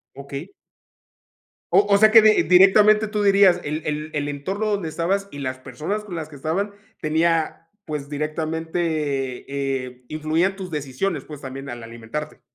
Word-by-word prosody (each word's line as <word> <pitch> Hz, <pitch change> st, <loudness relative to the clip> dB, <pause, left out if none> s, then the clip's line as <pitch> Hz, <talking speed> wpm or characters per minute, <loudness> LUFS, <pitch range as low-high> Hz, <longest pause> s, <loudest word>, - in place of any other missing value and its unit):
Okey. 140 Hz, +5 st, -7 dB, 1.2 s
O 205 Hz, -, +5 dB
o -, -, +6 dB
sea 215 Hz, +1 st, +6 dB
que 225 Hz, +1 st, +9 dB
di 215 Hz, 0 st, +5 dB
directamente 205 Hz, +5 st, +6 dB
tú 210 Hz, 0 st, -1 dB
dirías, 195 Hz, -3 st, +5 dB
el 155 Hz, +2 st, -3 dB
el 150 Hz, +1 st, -3 dB
el 145 Hz, -1 st, -2 dB
entorno 185 Hz, +10 st, -3 dB
donde 200 Hz, -5 st, -1 dB
estabas 185 Hz, +5 st, -1 dB
y 145 Hz, -, -9 dB
las 130 Hz, -2 st, -4 dB
personas 150 Hz, -, -4 dB
con 190 Hz, -4 st, -7 dB
las 160 Hz, -2 st, -5 dB
que 155 Hz, -, -14 dB
estaban 175 Hz, +9 st, -2 dB, 0.3 s
tenía, 160 Hz, +1 st, 0 dB, 0.2 s
pues, 150 Hz, -2 st, -5 dB
directamente, 155 Hz, +3 st, -3 dB, 1.1 s
eh, 125 Hz, 0 st, -17 dB
influían 160 Hz, +5 st, 0 dB
tus 190 Hz, -2 st, -7 dB
decisiones, 145 Hz, +3 st, -2 dB
pues, 150 Hz, -2 st, -10 dB
también 135 Hz, +1 st, -7 dB
al 120 Hz, -1 st, -7 dB
alimentarte. 115 Hz, +7 st, -7 dB
160 Hz, 160 wpm, -22 LUFS, 145-195 Hz, 1.2 s, que